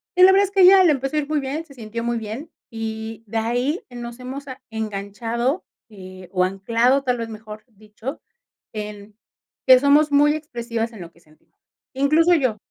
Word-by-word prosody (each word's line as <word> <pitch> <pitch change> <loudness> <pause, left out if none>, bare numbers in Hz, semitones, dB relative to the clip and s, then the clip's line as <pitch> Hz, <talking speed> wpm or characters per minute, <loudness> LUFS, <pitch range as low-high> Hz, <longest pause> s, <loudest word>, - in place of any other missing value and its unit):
Y 365 - +6
la 380 - +9
verdad, 395 +1 +5
es 395 - -9
que 395 -1 +3
a - - +8
ella 380 +1 +8
le 325 - +5
empezó 270 +2 -2
ir 295 -1 -1
muy 300 -1 0
bien, 285 +5 -4
se 280 - -16
sintió 230 -2 -6
muy 235 0 -1
bien. 225 +8 -6 0.2
Y, 225 0 -6
de 225 - -3
ahí, 245 +8 -1
eh, 245 - -10
nos 235 0 -7
hemos 270 +3 -7
a 260 0 -9
enganchado, 225 - -3 0.2
eh, 185 -3 -12
o 185 -1 +2
anclado, 230 +8 +1
tal 250 -2 0
vez, 230 -1 -4
mejor 215 -1 -10
dicho, 220 +5 -9 0.5
en 210 -1 -8 0.5
que 260 -1 +9
somos 290 +3 +4
muy 295 +1 +4
expresivas 235 -6 -4
en 210 - -10
lo 170 -1 -10
que 170 - -25
sentimos. 155 -2 -28 0.4
Incluso 305 +6 +3
yo 255 -9 +1
235 Hz, 200 wpm, -22 LUFS, 215-285 Hz, 0.5 s, la